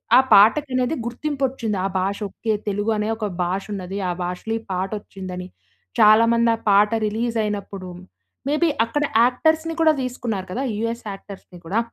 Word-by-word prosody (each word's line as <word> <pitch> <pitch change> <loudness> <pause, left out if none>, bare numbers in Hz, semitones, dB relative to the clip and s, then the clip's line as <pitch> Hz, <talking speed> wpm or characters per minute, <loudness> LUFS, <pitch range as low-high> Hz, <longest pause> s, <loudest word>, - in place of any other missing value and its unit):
ఆ - - +9
పాటకనేది 255 +6 +4
గుర్తింపొచ్చింది. 255 -4 -2
ఆ - - +2
భాష 195 +2 -1
ఓకే 220 +3 -2
తెలుగు 205 +2 0
అనే 210 +1 -1
ఒక 220 - -3 0.2
భాష 185 +3 -2
ఉన్నది. 190 0 -5
ఆ - - +1
భాషలో 180 +5 -4
ఈ - - -15
పాట 185 +1 -1
వచ్చిందని. 185 -2 -8 0.5
చాలా 215 +2 +7
మంది 235 0 +3
ఆ - - -10
పాట 205 +2 +5 0.2
రిలీజ్ 230 +2 -2
అయినప్పుడు 200 -2 -4 0.6
మే 290 - +1
బీ 335 - +4 0.2
అక్కడ 295 +6 -1 0.2
యాక్టర్స్‌ని 315 +6 +2
కూడా 315 -1 +5
తీసుకున్నారు 235 -6 -3
కదా! 255 +8 -2
యూఎస్ 230 +1 -3
యాక్టర్స్‌ని 195 -2 -11
కూడా. 195 +7 0
215 Hz, 160 wpm, -22 LUFS, 195-250 Hz, 0.6 s, ఆ